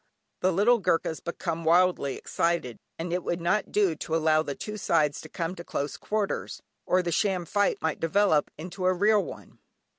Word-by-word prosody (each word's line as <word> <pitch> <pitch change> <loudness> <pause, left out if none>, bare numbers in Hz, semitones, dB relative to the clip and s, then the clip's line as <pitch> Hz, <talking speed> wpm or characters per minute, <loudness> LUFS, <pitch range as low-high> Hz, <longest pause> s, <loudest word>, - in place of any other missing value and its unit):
The 185 - +2
little 215 +7 +4
Goorkhas 165 -3 0
become 170 -1 -4
wildly 170 -4 +3
excited, 170 -8 -1 0.2
and 170 +1 -4
it 180 -1 -1
would 170 - -2
not 175 +5 0
do 200 -5 +3
to 160 - -3
allow 155 -1 +3
the 145 -3 -4
two 210 - -6
sides 150 -7 +1
to 155 - -11
come 165 +2 -3
to 170 - -9
close 145 -3 -3
quarters, 210 -2 -3 0.3
or 185 0 +3
the 175 - -2
sham 185 0 +1
fight 205 +3 +1
might 160 -2 -1
develop 165 -2 +2
into 180 +3 -4
a 185 - +3
real 205 +2 +3
one. - - -11
175 Hz, 185 wpm, -27 LUFS, 160-195 Hz, 0.3 s, little